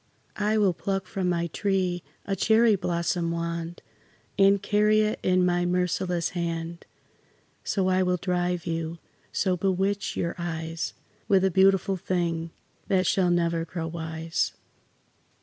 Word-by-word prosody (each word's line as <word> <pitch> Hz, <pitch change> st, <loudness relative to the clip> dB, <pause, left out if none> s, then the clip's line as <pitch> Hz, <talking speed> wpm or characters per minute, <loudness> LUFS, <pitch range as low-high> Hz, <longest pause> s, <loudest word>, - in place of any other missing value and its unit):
I 210 Hz, +1 st, +2 dB
will 200 Hz, -4 st, +3 dB
pluck 195 Hz, +2 st, -2 dB
from 185 Hz, -1 st, -2 dB
my 170 Hz, -1 st, 0 dB
tree 185 Hz, 0 st, -1 dB, 0.2 s
a 195 Hz, -, -1 dB
cherry 220 Hz, +3 st, +4 dB
blossom 170 Hz, -1 st, -1 dB
wand, 170 Hz, 0 st, -4 dB, 0.5 s
And 200 Hz, 0 st, +5 dB
carry 210 Hz, +2 st, +3 dB
it 215 Hz, 0 st, 0 dB
in 185 Hz, 0 st, +3 dB
my 175 Hz, 0 st, +2 dB
merciless 180 Hz, -1 st, 0 dB
hand, 170 Hz, -1 st, -4 dB, 0.8 s
So 190 Hz, -2 st, 0 dB
I 185 Hz, 0 st, +3 dB
will 180 Hz, -1 st, +1 dB
drive 180 Hz, -1 st, -1 dB
you, 165 Hz, -1 st, -3 dB, 0.3 s
so 185 Hz, -2 st, +1 dB
bewitch 195 Hz, +2 st, 0 dB
your 170 Hz, -, -1 dB
eyes, 165 Hz, -1 st, -4 dB, 0.3 s
With 195 Hz, -3 st, +4 dB
a 190 Hz, -, +2 dB
beautiful 195 Hz, +1 st, +3 dB
thing 170 Hz, -3 st, -1 dB, 0.4 s
that 190 Hz, -2 st, +2 dB
shall 185 Hz, -2 st, +2 dB
never 170 Hz, -1 st, +1 dB
grow 165 Hz, 0 st, -5 dB
wise. 160 Hz, 0 st, -2 dB
180 Hz, 135 wpm, -26 LUFS, 170-195 Hz, 0.8 s, And